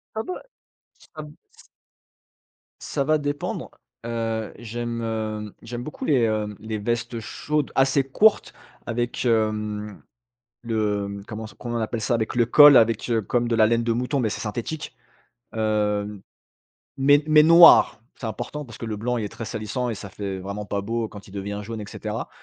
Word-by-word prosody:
Ah, 220 - -2
bah, 365 - -6 0.7
ça 155 - -6
me, 150 0 -12 0.2
c - - -19 1.2
ça 140 - -2
va 155 +2 +3
dépendre. 145 -1 -4 0.3
Heu, 115 -2 -3
j'aime, 120 0 -4
heu 110 -2 -3
j'aime 120 +1 -6
beaucoup 150 - -6
les, 135 -5 +3
hem, 105 -2 -1
les 110 0 -4
vestes 115 +2 -2
chaudes 150 +6 -2
assez 135 +1 +3
courtes 205 +11 +3 0.3
avec, 120 +2 -2
hem, 105 -2 -1 0.6
le, 105 -3 -1
mmh, 100 0 -7
comment 110 0 -6
s - - -11
comment 120 -1 -5
on - - -1
appelle 110 +1 -3
ça? 115 - 0
Avec 115 0 -1
le 120 -1 +3
col 145 +3 +9
avec, 115 +1 +2
heu 115 -1 +2
comme 120 +4 0
de 115 - +1
la 110 -1 +5
laine 115 +1 +2
de 115 - 0
mouton. 125 +4 -1
Mais 115 -4 +1
c'est - - -5
synthétique. 120 +8 -5 0.6
Hem, 105 -2 -1 0.8
mais 145 +2 +5
mais 155 -1 +7
noir, 165 -6 +8 0.2
c'est 120 - -6
important, 150 +7 -5
parce 120 - -11
que - - -6
le 110 -1 -3
blanc 125 +3 -1
il 110 - -2
est - - -3
très 115 - -7
salissant 120 +4 -3
et - - -2
ça 100 -1 -9
fait 100 -1 -5
vraiment 100 +2 -6
pas 100 0 -2
beau 115 +1 -2
quand 100 -2 -12
il - - -14
devient 100 +1 -4
jaune 115 +1 -6
et 105 - -7
cetera. - - -5
115 Hz, 185 wpm, -24 LUFS, 105-125 Hz, 1.2 s, col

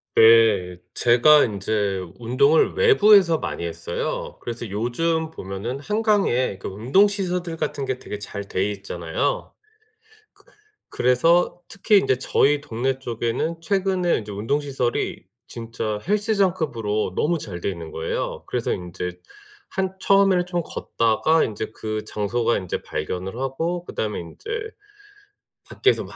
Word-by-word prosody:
네. 110 -6 +5 0.2
제가 125 +5 +6
인제 100 -2 -1 0.2
운동을 130 +7 +3
외부에서 210 - +5
많이 - - -4
했어요. 85 +1 -4
그래서 120 -1 -5
요즘 160 +10 -1
보면은 110 +1 -5
한강에 200 - +1
그 - - -7
운동 125 - +3
시설들 180 -4 -2
같은 140 -3 -2
게 130 -1 -3
되게 105 - -6
잘 100 0 -6
돼 100 +2 -1
있잖아요. 95 - -3 0.8
그 - - -27 0.4
그래서 165 +9 +2
특히 205 +2 +2
인제 130 -10 +2
저희 145 +2 +2
동네 130 0 -2
쪽에는 120 +7 -2
최근에 185 0 +1
인제 105 -2 -8
운동 115 +9 -1
시설이 135 -4 -2 0.2
진짜 115 -2 -4
헬스장급으로 180 - 0
너무 165 +2 +1
잘 90 -9 -7
돼 - - -2
있는 85 -4 -6
거예요. 80 - -3
그래서 - - -2
인제 90 0 -5 0.5
한 190 0 -2
처음에는 195 -2 +4
좀 175 -1 -1
걷다가 135 +6 +1
인제 110 0 -4
그 110 -1 -4
장소가 115 +3 0
인제 90 - -4
발견을 95 +3 -4
하고 165 +7 -2
그다음에 105 -9 -3
인제 85 - -10 1.2
밖에서 405 - +2
막 - - -12
125 Hz, 285 characters per minute, -23 LUFS, 105-170 Hz, 1.2 s, 제가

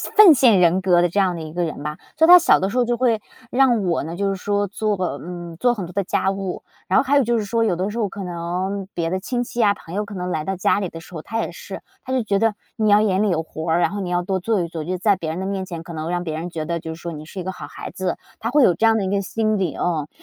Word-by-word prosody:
奉 395 -8 +9
献 235 -7 +5
人 180 +2 +4
格 180 -2 +4
的 175 - +2
这 200 - 0
样 185 -3 +2
的 165 - -6
一 155 -1 -7
个 175 +1 -1
人 155 -3 -4
吧。 150 +1 -4 0.2
所 320 +1 +4
以 - - +2
她 360 - +12
小 340 - +4
的 190 - 0
时 250 - -3
候 245 - +3
就 240 0 0
会 235 -3 +2 0.3
让 245 -5 +3
我 170 -4 0
呢 165 +2 -5
就 200 +2 0
是 195 - -1
说 205 +1 -1
做， 210 +1 -1 0.2
嗯， 175 -1 -8
做 245 -1 +3
很 195 -7 -5
多 180 - -11
的 200 +2 0
家 190 - 0
务， 195 -1 -4 0.3
然 185 - +4
后 - - +2
还 285 +2 +3
有 275 - +4
就 235 0 +1
是 210 - -3
说 230 +2 +1
有 200 -6 +1
的 185 +4 -2
时 215 - -6
候 220 -3 +1
可 195 0 -7
能 180 +3 -3
别 165 -1 -1
的 185 +1 -1
亲 245 +5 -2
戚 240 0 -7
呀 205 -2 +4
朋 180 -2 -10
友 210 0 -1
可 205 - -10
能 180 -1 -4
来 155 -4 -2
到 190 +4 -2
家 190 - +2
里 195 - -2
的 165 - -9
时 175 - -13
候， 155 - -6
她 225 +1 -3
也 - - -4
是， - - -8 0.2
她 260 - -4
就 260 - +2
觉 200 -3 0
得 225 +1 +2 0.2
你 220 -2 0
要 205 +1 +6
眼 200 -1 +2
里 205 - +2
有 160 -1 +1
活 160 0 -5
儿， 165 - +3
然 - - +3
后 205 - -5
你 185 -2 -3
要 175 0 +1
多 190 +1 -1
做 210 +1 0
一 170 - -2
做， 160 -2 -5
就 175 - -4
是 185 - -2
在 205 0 +3
别 160 -3 -4
人 165 - -4
的 190 - -3
面 195 -1 -2
前 170 -3 -6
可 170 - -10
能 160 +1 -4
让 175 0 -1
别 160 -2 -4
人 170 +2 -5
觉 160 -2 -4
得 170 +1 -2
就 160 0 -6
是 165 - -12
说 170 - -5
你 155 -1 -8
是 190 +4 -8
一 - - -4
个 190 - -3
好 155 - -8
孩 - - -8
子， 185 -2 -2 0.2
她 230 +2 -2
会 295 -3 +5
有 175 - +5
这 220 - +1
样 225 0 +5
的 215 - 0
一 - - -1
个 200 0 0
心 215 +1 0
理 185 -7 -1
哦。 160 -4 -1
190 Hz, 360 characters per minute, -21 LUFS, 170-215 Hz, 0.3 s, 她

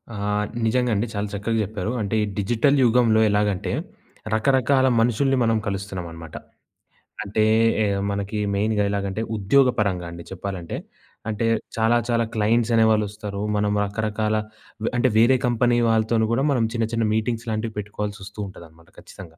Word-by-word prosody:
ఆ! - - -6 0.5
నిజంగా 125 +1 +1
అండి. 105 +4 0
చాలా 100 +1 -2
చక్కగా 105 +3 -1
జెప్పారు. 105 0 -4
అంటే 105 +1 -2
ఈ - - +1
డిజిటల్ 120 +8 +2
యుగంలో 115 -2 +4
ఎలాగంటే, 105 -2 0 0.6
రకరకాల 130 +3 +3
మనుషుల్ని 125 +4 +2
మనం 115 -1 +2
కలుస్తున్నామనమాట. 90 -5 -6 0.9
అంటే 105 +2 0 0.4
ఎ - - +2 0.3
మనకి 100 +1 -3 0.2
మెయిన్‌గా 105 +1 +1
ఎలాగంటే, 100 +1 -2 0.2
ఉద్యోగపరంగా 105 -5 +2
అండి 85 0 -9
చెప్పాలంటే. 95 -2 -5 0.5
అంటే 110 +1 -1 0.3
చాలా 115 +1 +3
చాలా 115 -1 +2
క్లయింట్స్ 115 +2 +1
అనేవాాళ్ళొస్తారు. 105 -2 +1 0.2
మనం 105 0 +1
రకరకాల 110 +1 -1 0.5
వ - - -1
అంటే 120 - +3
వేరే 120 +4 +5
కంపెనీ 120 0 +2
వాళ్ళతోని 110 0 +2
గూడా 125 +4 +1
మనం 125 -4 +2
చిన్న 115 -2 0
చిన్న 115 -1 0
మీటింగ్స్ 115 +1 -1
లాంటివి 110 0 -2
పెట్టుకోవాల్సొస్తూ 105 0 -6
ఉంటదనమాట 85 -3 -14
ఖచ్చితంగా. 85 -4 -13
110 Hz, 135 wpm, -23 LUFS, 100-115 Hz, 0.9 s, వేరే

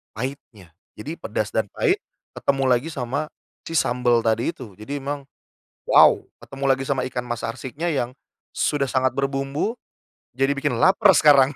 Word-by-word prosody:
pahitnya. 110 - -7 0.2
Jadi, 150 +10 -5
pedas - - -3
dan - - 0
pahit 415 -4 +1 0.4
ketemu 135 -1 0
lagi 125 +3 +2
sama 140 +2 -3 0.4
si 165 - -4
sambal 120 -2 +2
tadi 115 +6 +1
itu. 110 -7 -11
Jadi 140 +7 -5
emang, 140 +1 -4 0.7
wow, - - +7 0.2
ketemu 135 0 -6
lagi 135 0 +2
sama 130 -2 0
ikan 125 -1 -4
mas 120 -1 -4
arsiknya 140 +8 -4
yang 125 -3 -2 0.4
sudah 145 -2 0
sangat 130 -1 +1
berbumbu 135 - -1 0.6
jadi 135 +1 +2
bikin 140 -3 -1
laper 195 +1 +6
sekarang. 140 -2 +6
135 Hz, 150 wpm, -23 LUFS, 125-145 Hz, 0.7 s, wow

